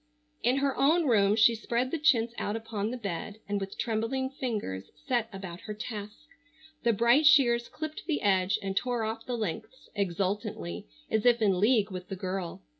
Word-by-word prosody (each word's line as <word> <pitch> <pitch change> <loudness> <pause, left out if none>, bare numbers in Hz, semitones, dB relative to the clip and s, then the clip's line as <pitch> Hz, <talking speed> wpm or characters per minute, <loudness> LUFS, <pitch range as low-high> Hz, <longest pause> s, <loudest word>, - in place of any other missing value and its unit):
In 250 +3 +2
her 275 -1 +1
own 320 +4 +4
room 210 -5 +4
she 225 +1 +6
spread 235 +3 -1
the 330 - -1
chintz 240 -6 +3
out 205 - -2
upon 220 -2 -3
the 250 - -4
bed 200 -1 -5
and 205 0 -1
with 195 0 -6
trembling 240 +4 -1
fingers 215 - -4 0.2
set 240 -3 0
about 190 -3 -7
her 210 - -7
task. 210 +4 -7 0.6
The 235 - +3
bright 235 +7 +4
shears 240 -6 +5
clipped 310 0 -6
the 315 -4 -1
edge 190 -1 +3
and 195 -1 -3
tore 245 +1 0
off 225 +2 -4
the 245 -1 -2
lengths 215 - -5
exultantly 185 - -2 0.2
as 220 -1 +2
if 240 -1 +5
in 195 -4 +2
league 215 -1 +3
with 185 -1 -6
the 195 - -3
girl. 185 0 -4
220 Hz, 185 wpm, -29 LUFS, 195-245 Hz, 0.6 s, she